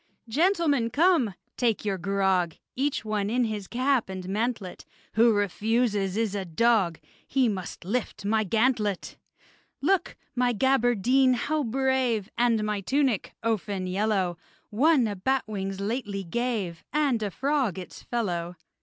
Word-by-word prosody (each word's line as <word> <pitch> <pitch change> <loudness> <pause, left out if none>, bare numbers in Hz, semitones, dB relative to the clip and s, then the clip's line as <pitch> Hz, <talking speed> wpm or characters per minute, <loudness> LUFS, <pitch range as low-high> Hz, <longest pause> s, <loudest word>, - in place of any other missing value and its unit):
Gentlemen, 300 - +2
come! 290 - +3 0.2
take 230 -4 +1
your 195 -2 -1
grog! 190 -2 +1 0.2
Each 275 -3 -1
one 210 -2 -1
in 245 +2 +2
his 210 -4 -3
cap 255 -2 +1
and 185 -1 -6
mantlet: 210 -2 -2 0.3
Who 230 +1 +5
refuses 205 0 0
is 225 -3 0
a 200 -1 -2
dog! 185 -1 +2 0.3
He 265 -2 +2
must 185 -4 -4
lift 215 0 -3
my 215 +1 +2
gantlet! 215 -1 0 0.6
Look! 385 -2 +1 0.2
my 245 -1 +1
gaberdine 255 +1 +3
how 305 +5 -1
brave! 255 -4 0
And 235 -3 +2
my 210 -1 -1
tunic, 265 -1 0
ouphen 205 -4 -1
yellow! 190 -2 0 0.3
One 270 +4 +4
a 205 - -3
bat's 260 +6 0
wing 195 -2 -4
lately 205 -1 -3
gave, 200 -3 -2
And 285 -6 +1
a 210 - -1
frog 265 - 0
its 185 - -8
fellow. 180 -7 -2
220 Hz, 135 wpm, -27 LUFS, 195-250 Hz, 0.6 s, Who